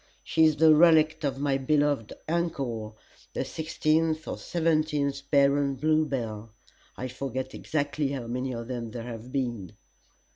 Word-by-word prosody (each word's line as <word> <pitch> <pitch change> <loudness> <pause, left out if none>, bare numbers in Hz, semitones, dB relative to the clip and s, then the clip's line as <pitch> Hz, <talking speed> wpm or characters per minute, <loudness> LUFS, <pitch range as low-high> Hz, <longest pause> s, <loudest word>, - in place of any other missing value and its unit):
She 160 0 +3
is 155 -1 +4
the 155 +1 +6
relict 160 -1 +5
of 140 -2 -1
my 140 -1 +1
beloved 145 -4 +1 0.2
uncle, 135 -10 -2 0.4
the - - -2
sixteenth 160 0 0
or - - -3
seventeenth 155 -4 0
Baron 140 -1 +3
Bluebell 130 -7 -1 0.5
I 130 - -4
forget 130 0 -5
exactly 145 -1 -1
how 135 -3 -4
many 125 +3 -3
of 115 -1 -5
them 120 -2 -4
there 115 +1 -6
have 120 +1 -8
been. 120 -9 -3
140 Hz, 140 wpm, -27 LUFS, 125-155 Hz, 0.5 s, the